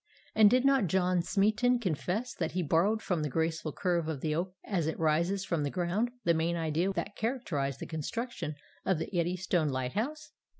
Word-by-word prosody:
And 215 Hz, -1 st, +7 dB
did 255 Hz, +3 st, +3 dB
not 270 Hz, -7 st, +4 dB
John 180 Hz, +1 st, +2 dB
Smeaton 215 Hz, +7 st, +2 dB
confess 205 Hz, -, -2 dB
that 165 Hz, -2 st, -3 dB
he 180 Hz, 0 st, 0 dB
borrowed 190 Hz, +8 st, +2 dB
from 175 Hz, -4 st, 0 dB
the 150 Hz, -, -1 dB
graceful 160 Hz, +2 st, -1 dB
curve 175 Hz, -1 st, 0 dB
of 155 Hz, -4 st, -3 dB
the 155 Hz, -1 st, 0 dB
oak 180 Hz, +3 st, -2 dB
as 175 Hz, -7 st, -1 dB
it 160 Hz, -, -2 dB
rises 170 Hz, +5 st, +1 dB
from 170 Hz, -5 st, 0 dB
the 145 Hz, -, 0 dB
ground 185 Hz, +8 st, 0 dB
the 170 Hz, -, +4 dB
main 165 Hz, +1 st, +1 dB
idea 165 Hz, +3 st, 0 dB
that 205 Hz, +1 st, -3 dB
characterized 165 Hz, -, -2 dB
the -, -, -5 dB
construction 165 Hz, -, -4 dB, 0.3 s
of 190 Hz, -, +1 dB
the 160 Hz, +4 st, -5 dB
Eddystone 175 Hz, -2 st, +1 dB
lighthouse? 210 Hz, -, -3 dB
175 Hz, 185 wpm, -31 LUFS, 160-205 Hz, 0.3 s, And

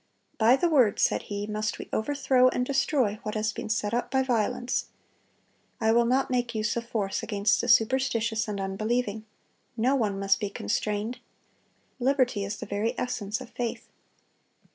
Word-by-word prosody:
"By 230 Hz, +3 st, +6 dB
the 345 Hz, +6 st, +1 dB
Word," 260 Hz, -11 st, +4 dB
said -, -, +2 dB
he, 205 Hz, 0 st, -3 dB
"must 215 Hz, 0 st, -2 dB
we -, -, -8 dB
overthrow 260 Hz, +1 st, +3 dB
and 250 Hz, -1 st, 0 dB
destroy 265 Hz, -5 st, +1 dB
what 215 Hz, -2 st, -5 dB
has 215 Hz, 0 st, 0 dB
been -, -, -6 dB
set 215 Hz, -1 st, -1 dB
up 240 Hz, +1 st, -1 dB
by 265 Hz, +1 st, +2 dB
violence. 245 Hz, 0 st, 0 dB, 0.9 s
I 220 Hz, 0 st, +3 dB
will 235 Hz, +1 st, +4 dB
not 260 Hz, +2 st, +1 dB
make 245 Hz, -2 st, -1 dB
use 215 Hz, 0 st, 0 dB
of 235 Hz, 0 st, -4 dB
force 200 Hz, -5 st, -1 dB
against 210 Hz, -2 st, +1 dB
the -, -, -3 dB
superstitious 230 Hz, -1 st, +2 dB
and 205 Hz, -1 st, -3 dB
unbelieving.... 215 Hz, +3 st, -2 dB, 0.5 s
No 245 Hz, +4 st, +2 dB
one 210 Hz, -6 st, 0 dB
must 195 Hz, +1 st, +2 dB
be 205 Hz, -2 st, -2 dB
constrained. 210 Hz, -, -2 dB, 0.8 s
Liberty 255 Hz, -5 st, +1 dB
is 200 Hz, +1 st, -4 dB
the -, -, -6 dB
very 205 Hz, +3 st, -2 dB
essence 225 Hz, -2 st, -3 dB
of 255 Hz, -, -10 dB
faith." 240 Hz, -2 st, -4 dB
225 Hz, 165 wpm, -27 LUFS, 210-250 Hz, 0.9 s, By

